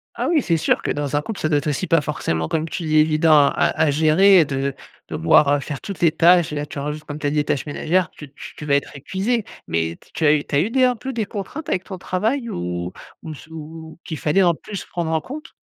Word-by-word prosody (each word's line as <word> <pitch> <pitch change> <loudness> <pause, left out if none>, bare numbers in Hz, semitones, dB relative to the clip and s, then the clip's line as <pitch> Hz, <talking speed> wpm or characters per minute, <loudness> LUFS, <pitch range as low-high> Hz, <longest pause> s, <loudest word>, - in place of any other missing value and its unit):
Ah - - -2
oui, 325 -3 +3
c'est 170 -7 +1
sûr 155 - +1
que, - - -2
dans 145 -1 -2
un 145 - +2
couple, 210 +6 -6
ça 155 - 0
doit 150 - +3
être 145 - -6
aussi, 150 +5 -1
pas 165 -1 +3
forcément 80 - -2
comme 160 - -1
tu 170 - -5
dis: 155 -1 0
«Évident» 155 +1 +4
à - - +3
à 160 - 0
à - - +3
gérer, 165 +6 +5
heu, - - +2
de 135 -1 -2 0.3
devoir, 85 - +4
heu, 145 - +2
faire 140 0 -6
toutes 200 -3 -7
les 165 -2 +5
tâches 170 0 +4
et - - -4
là, 145 0 -2
tu 145 - -7
rajoutes, 150 +2 -4
comme 150 -1 -7
tu 145 - -1
as - - +2
dit: 145 - -3
«Les 145 - +3
tâches 145 - -1
ménagères» 165 +4 0
tu 145 -3 -11
tu - - -11
tu 150 - -8
vas 140 -1 +3
être 140 - -2
épuisée, 195 - -2 0.2
mais 80 0 -1
t - - -24
tu 160 - -1
as 150 - +6
eu 150 -1 +1
tu - - -4
as - - +4
eu 200 - 0
des 260 +1 +3
un 250 -1 +2
peu 260 +3 -6
des 225 -3 -1
contraintes 205 +10 -6
avec 185 - 0
ton 190 - -8
travail 225 +8 -1
ou 90 - -4 0.3
ou - - -9
m 155 - -6
sous 160 +3 -14
ou 160 +1 -10
qu'il 160 - -5
fallait, 160 +7 +2
en 170 -2 +3
plus, 200 +4 -7
prendre 170 -2 -3
en 160 -1 +1
compte? 295 - -9
155 Hz, 290 wpm, -21 LUFS, 145-185 Hz, 0.3 s, as